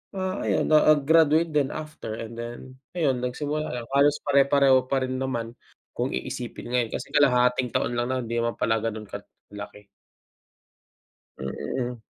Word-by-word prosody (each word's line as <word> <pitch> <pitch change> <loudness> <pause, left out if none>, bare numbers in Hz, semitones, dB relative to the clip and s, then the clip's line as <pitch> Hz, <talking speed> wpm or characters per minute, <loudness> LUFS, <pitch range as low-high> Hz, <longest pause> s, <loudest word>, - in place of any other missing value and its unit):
ah, 190 0 -2
ayun - - +1
na 155 -1 +5
ag 145 - 0
graduate 160 0 +4
din 145 -3 +1
after 155 -8 -6
and 115 0 -7
then 120 0 -6 0.4
ayun, 135 -7 +1
nagsimula 150 +4 -3
lang 120 -1 -5
halos 145 +1 +4
pare-pareho 140 -2 +4
pa 135 -1 +1
rin 130 0 -3
naman 120 -3 -3 0.4
kung - - -1
iisipin - - -5
ngayon 120 -3 +1
kasi - - -5
kalahating 125 -3 +3
taon 120 - 0
lang 120 +1 -1
nun, 130 - -1
hindi 115 +1 -2
naman 115 0 -1
pala 115 +1 +2
ganun 110 -2 -4
kalaki. 105 0 -10 1.5
Mm. 120 - -4
130 Hz, 155 wpm, -25 LUFS, 115-145 Hz, 1.5 s, na